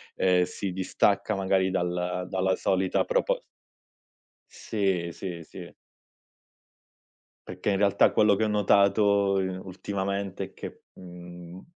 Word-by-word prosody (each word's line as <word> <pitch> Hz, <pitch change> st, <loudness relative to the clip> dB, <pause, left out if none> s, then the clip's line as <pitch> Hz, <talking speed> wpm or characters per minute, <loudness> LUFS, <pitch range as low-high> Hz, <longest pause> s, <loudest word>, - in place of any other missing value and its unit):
ehm, 90 Hz, -1 st, +3 dB
si 95 Hz, +1 st, -5 dB
distacca 100 Hz, +3 st, 0 dB
magari 95 Hz, -1 st, +1 dB
dal 90 Hz, 0 st, -2 dB
dalla 95 Hz, 0 st, +1 dB
solita 95 Hz, -1 st, +1 dB
propos -, -, 0 dB, 1.1 s
Sì, 95 Hz, -6 st, -2 dB
sì, 85 Hz, -1 st, -7 dB
sì. -, -, -11 dB, 1.8 s
Perché, 90 Hz, +3 st, -2 dB
in 95 Hz, -, +1 dB
realtà, 100 Hz, 0 st, +4 dB
quello 105 Hz, -2 st, +4 dB
che 110 Hz, -, 0 dB
ho -, -, +2 dB
notato 100 Hz, 0 st, +3 dB, 0.6 s
ultimamente 100 Hz, +1 st, -4 dB
è -, -, -16 dB
che, -, -, -9 dB
uhm, 90 Hz, 0 st, -11 dB
95 Hz, 110 wpm, -27 LUFS, 90-100 Hz, 1.8 s, realtà